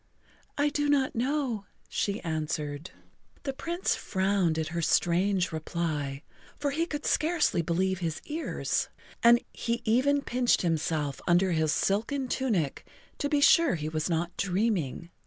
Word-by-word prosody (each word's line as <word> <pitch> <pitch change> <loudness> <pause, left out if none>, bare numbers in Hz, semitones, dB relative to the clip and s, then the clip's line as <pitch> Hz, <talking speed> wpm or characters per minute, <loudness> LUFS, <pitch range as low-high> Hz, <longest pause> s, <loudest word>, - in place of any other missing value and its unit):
"I 290 +1 +3
do 290 0 0
not 275 -2 +2
know," 250 -5 -1 0.2
she 205 +1 -2
answered. 155 -1 -3 0.5
The 275 - -2
Prince 340 +6 -1
frowned 190 -4 0
at 160 -1 -1
her 170 +1 -2
strange 180 +3 +2
reply, 155 -3 -3 0.3
for 285 -1 -1
he 325 +4 0
could 295 -2 -5
scarcely 310 - +2
believe 185 +3 0
his 165 -3 -2
ears, 315 +2 -2 0.3
and 235 +1 +7
he 235 0 -2
even 275 +5 +3
pinched 245 -5 +2
himself 155 -4 -1
under 180 +2 +4
his 160 -2 +2
silken 240 - 0
tunic 205 - -1 0.4
to 285 - -1
be 290 -1 +2
sure 300 - +5
he 155 -1 -3
was 155 +2 -2
not 170 +1 -1
dreaming. 180 - -1
195 Hz, 140 wpm, -28 LUFS, 165-270 Hz, 0.5 s, and